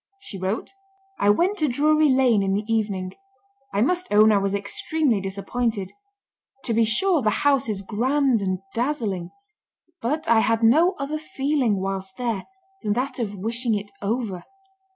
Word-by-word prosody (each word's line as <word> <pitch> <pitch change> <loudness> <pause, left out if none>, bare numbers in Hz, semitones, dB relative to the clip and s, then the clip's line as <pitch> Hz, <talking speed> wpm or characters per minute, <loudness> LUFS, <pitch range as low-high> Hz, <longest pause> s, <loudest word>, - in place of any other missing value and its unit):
She 205 - -9
wrote: 190 +4 -3 0.5
"I 205 - +3
went 365 - +2
to 305 - +2
Drury 305 +4 +3
Lane 255 -5 +4
in 195 0 0
the 205 +1 -2
evening. 205 -5 -1 0.6
I 200 - 0
must 360 +8 0
own 215 +1 +6
I 205 - +4
was 195 0 -1
extremely 230 +4 -1
disappointed; 200 +1 -3 0.7
to 235 - -1
be 230 +1 +3
sure, 320 - +3
the 215 - +2 0.2
house 275 -4 +3
is 200 -2 -2
grand 250 +3 +1
and 185 -1 -2
dazzling; 230 -9 -2 0.7
but 300 +7 -2
I 230 0 +5
had 225 +1 +1
no 320 +11 +5
other 290 +2 -3
feeling 270 -8 0
whilst 190 0 -4
there 230 -6 -3 0.3
than 205 - 0
that 255 +4 -3
of 210 -4 -3
wishing 230 +3 -1
it 205 0 -5
over.... 205 -4 -2
225 Hz, 160 wpm, -23 LUFS, 200-275 Hz, 0.7 s, own